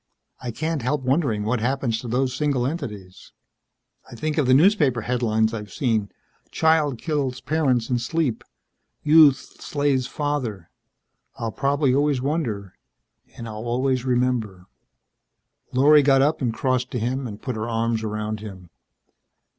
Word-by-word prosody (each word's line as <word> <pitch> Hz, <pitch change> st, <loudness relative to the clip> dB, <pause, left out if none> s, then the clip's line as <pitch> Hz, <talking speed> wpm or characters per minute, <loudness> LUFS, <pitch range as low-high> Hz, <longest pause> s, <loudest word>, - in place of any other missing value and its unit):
_' -, -, -55 dB, 0.4 s
"I 125 Hz, -, -5 dB
can't 155 Hz, +4 st, -2 dB
help 130 Hz, +3 st, -1 dB
wondering 130 Hz, -6 st, +1 dB
what 115 Hz, +3 st, 0 dB
happens 120 Hz, -1 st, -1 dB
to 125 Hz, -, -7 dB
those 125 Hz, +2 st, 0 dB
single 140 Hz, -4 st, 0 dB
entities. 105 Hz, -, -6 dB, 0.8 s
I -, -, -9 dB
think 155 Hz, +6 st, -2 dB
of 140 Hz, -, +1 dB
the 130 Hz, -, +5 dB
newspaper 150 Hz, -, +4 dB
headlines 110 Hz, -2 st, 0 dB
I've 105 Hz, -3 st, -6 dB
seen: 110 Hz, -3 st, -1 dB, 0.4 s
Child 160 Hz, -5 st, +2 dB
Kills 140 Hz, -3 st, -2 dB
Parents 135 Hz, -7 st, 0 dB
in 125 Hz, -1 st, 0 dB
Sleep. 140 Hz, 0 st, -1 dB, 0.6 s
Youth 150 Hz, -3 st, +4 dB
Slays 140 Hz, -3 st, 0 dB
Father. 130 Hz, -, -3 dB, 0.6 s
I'll 115 Hz, -1 st, -4 dB
probably 140 Hz, 0 st, +1 dB
always 145 Hz, 0 st, +2 dB
wonder 125 Hz, -, -2 dB, 0.6 s
and 115 Hz, -, -7 dB
I'll 110 Hz, +1 st, -7 dB
always 130 Hz, +1 st, 0 dB
remember...." 120 Hz, -7 st, -1 dB, 1.1 s
Lorry 145 Hz, +4 st, +6 dB
got 135 Hz, -1 st, +4 dB
up 150 Hz, +2 st, +1 dB
and 120 Hz, -3 st, +1 dB
crossed 130 Hz, +2 st, -1 dB
to 125 Hz, -, -1 dB
him 125 Hz, +3 st, -2 dB
and 105 Hz, -2 st, -8 dB
put 130 Hz, -3 st, -4 dB
her 110 Hz, +2 st, -3 dB
arms 115 Hz, 0 st, 0 dB
around 110 Hz, 0 st, -3 dB
him. 95 Hz, -5 st, -10 dB
125 Hz, 145 wpm, -23 LUFS, 110-145 Hz, 1.1 s, Lorry